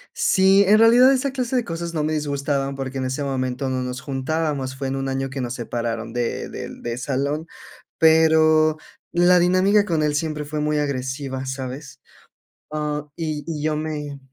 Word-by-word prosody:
sí, 195 - +4
en 210 +2 +6
realidad 245 +4 +7
esa 270 +1 0
clase 255 -1 -3
de 245 - +1
cosas 170 0 -5
no 155 - 0
me 155 +1 -1
disgustaban 140 -2 -1
porque 135 0 -5
en 130 - -2
ese 130 +3 -2
momento 130 -1 -2
no 130 -1 -1
nos 125 0 -4
juntábamos, 135 -1 -2
fue 135 0 -3
en 135 - -2
un 135 0 -3
año 135 0 -2
que 135 0 -5
nos 125 0 -3
separaron 115 -2 -4
de 120 -1 -2
del - - -8
de 120 0 -4
salón, 140 +4 -2 0.5
pero 155 -1 +5 0.3
la 175 +1 +5
dinámica 185 +4 +4
con 165 -5 0
él 150 -1 +1
siempre 150 -1 -2
fue 150 +1 -4
muy 150 0 0
agresiva, 130 -1 -3
¿sabes? 130 +2 -6 0.7
Ah, 150 -1 -2
y 155 -3 -3
y 155 -2 -4
yo 155 -1 0
me, 150 -2 -4
150 Hz, 180 wpm, -22 LUFS, 135-160 Hz, 0.7 s, realidad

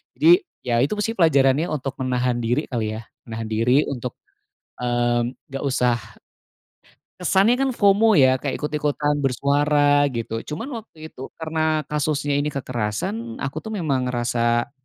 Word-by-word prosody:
Jadi 345 +3 +6 0.3
ya 120 -1 +1
itu 145 +10 +1
sih 225 - -1
pelajarannya 145 -2 +4
untuk 140 -2 -3
menahan 125 -1 0
diri 120 +6 0
kali, 110 -3 -2
ya? 110 - -7 0.2
Menahan 115 0 -5
diri 125 +6 +3
untuk, 125 -3 -4 0.7
mmm, 120 0 0 0.2
nggak 135 - -4
usah 125 -3 +2 1.2
kesannya 195 +7 +3
kan 270 -1 0
FOMO, 210 +1 +4
ya, 130 -5 +5
kayak 140 0 -3
ikut-ikutan 150 0 0
bersuara, 145 +2 +2
gitu. 115 -1 -3
Cuman 180 - -5
waktu 160 -7 -12
itu 130 - -8
karena 160 -1 -1
kasusnya 150 -1 0
ini 145 - 0
kekerasan, 115 -4 -3
aku 140 +3 -3
tuh 220 +7 -6
memang 140 -9 -1
ngerasa 120 0 0
140 Hz, 140 wpm, -22 LUFS, 120-155 Hz, 1.2 s, Jadi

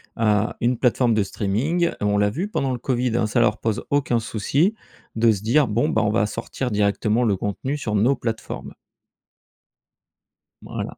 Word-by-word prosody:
Heu, 105 -1 +2
une 120 +1 +1
plateforme 125 -1 +2
de 110 -2 +2
streaming. 120 - 0
Et - - -5
on 105 0 +2
l'a 105 0 +3
vu 170 - -3
pendant 135 -10 -1
le 125 - -3
Covid, 125 -1 -1
hein, 110 - +1
ça 105 +3 0
leur 110 -3 +3
pose 110 -2 -2
aucun 140 -4 +1
souci 135 - 0 0.4
de 115 0 +4
se 100 -3 -2
dire: 130 +6 +3
«Bon, 110 +3 +1
ben 110 - +1
on 105 - +1
va 110 -1 +2
sortir 115 +3 -4
directement 105 +3 +1
le 105 -5 +2
contenu 115 +9 -3
sur 110 -7 -3
nos 120 +7 +3
plateformes.» 115 -3 -5 1.9
Voilà. - - -6
115 Hz, 180 wpm, -22 LUFS, 105-125 Hz, 1.9 s, de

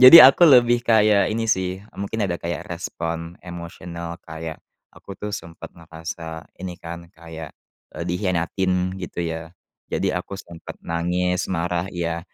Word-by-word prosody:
Jadi 130 +6 +13
aku 135 +6 +7
lebih 120 -2 +6
kayak 110 -3 +4
ini, 115 +1 -1
sih, 95 -1 0 0.2
mungkin 100 +2 -1
ada 85 -2 -1
kayak 85 -3 -3
respon 85 +1 -4
emosional, 85 -1 -7
kayak 80 0 -6 0.4
aku, 100 - -10
tuh, 105 - -4
sempat 85 -2 -8
ngerasa 80 0 -7
ini, 90 0 -5
kan, 85 0 -7
kayak, 80 -1 -9 0.4
eee, - - -4
dikhianatin, 90 +1 0
gitu, 90 -1 -4
ya. 80 0 -4 0.4
Jadi - - 0
aku 100 - -4
sempat 85 -3 -10
nangis, 90 +2 0
marah, 90 0 -1
iya, 85 -2 -2
85 Hz, 140 wpm, -23 LUFS, 85-95 Hz, 0.4 s, Jadi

